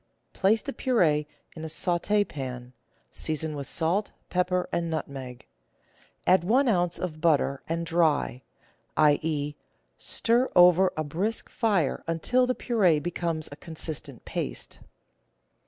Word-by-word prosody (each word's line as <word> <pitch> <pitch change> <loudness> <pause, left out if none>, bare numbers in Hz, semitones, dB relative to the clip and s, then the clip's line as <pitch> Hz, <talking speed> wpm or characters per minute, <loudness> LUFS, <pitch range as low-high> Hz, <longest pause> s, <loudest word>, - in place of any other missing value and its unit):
Place 210 +4 +2
the 280 - -5
pur^e 155 - +2 0.3
in 160 - -7
a - - -3
saut^pan; 160 -8 -1 0.4
season 155 0 -3
with 140 -2 -5
salt, 175 +6 0 0.2
pepper, 180 0 +1
and 170 -1 -1
nutmeg; 135 -5 -5 0.8
add 185 -2 +5
one 255 +9 +3
oz. 175 -6 +1
of 155 -4 -5
butter, 145 -4 +2
and 170 +1 -1
dry; 160 -6 +1 0.6
i.e., 150 -1 +2 0.5
stir 240 +3 +1
over 180 +1 +6
a 155 - 0
brisk 185 +10 -2
fire 200 - 0
until 245 +10 +2
the 255 - 0
pur^e 185 - +2
becomes 170 -2 -2
a - - -7
consistent 160 0 -6
paste. - - -4
165 Hz, 120 wpm, -27 LUFS, 150-190 Hz, 0.8 s, over